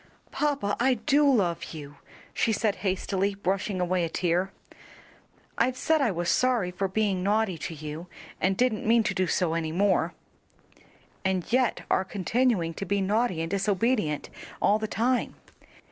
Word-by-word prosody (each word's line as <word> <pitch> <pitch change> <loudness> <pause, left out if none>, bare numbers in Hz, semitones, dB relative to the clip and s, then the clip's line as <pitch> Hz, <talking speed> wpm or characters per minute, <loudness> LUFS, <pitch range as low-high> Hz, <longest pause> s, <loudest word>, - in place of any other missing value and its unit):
"Papa, 280 -9 0
I 255 +1 +3
do 285 +5 +3
love 170 -8 0
you," 145 -2 -9 0.4
she 225 - +1
said, 215 -1 0
hastily 195 0 -1
brushing 195 0 -1
away 180 0 +1
a 165 - -1
tear. 180 +3 0 1.1
"I've 250 +2 +2
said 315 +3 +2
I 265 - +3
was 175 -3 -2
sorry 240 -7 +2
for 195 +2 -1
being 195 -1 0
naughty 205 0 +1
to 175 0 -5
you 155 +3 -7 0.3
and 190 0 +1
didn't 245 -4 +1
mean 230 0 +5
to - - -1
do 185 0 0
so 165 -1 +1
any 165 -1 -1
more." 195 +3 +1 1.1
"And 190 -2 0
yet 255 -1 +2
are 190 - +3
continuing 195 -2 0
to - - -1
be 200 +2 0
naughty 200 -2 +1
and 165 - -5
disobedient 200 - 0 0.3
all 210 +1 +3
the 215 - -2
time. 245 +4 0
195 Hz, 160 wpm, -27 LUFS, 180-230 Hz, 1.1 s, mean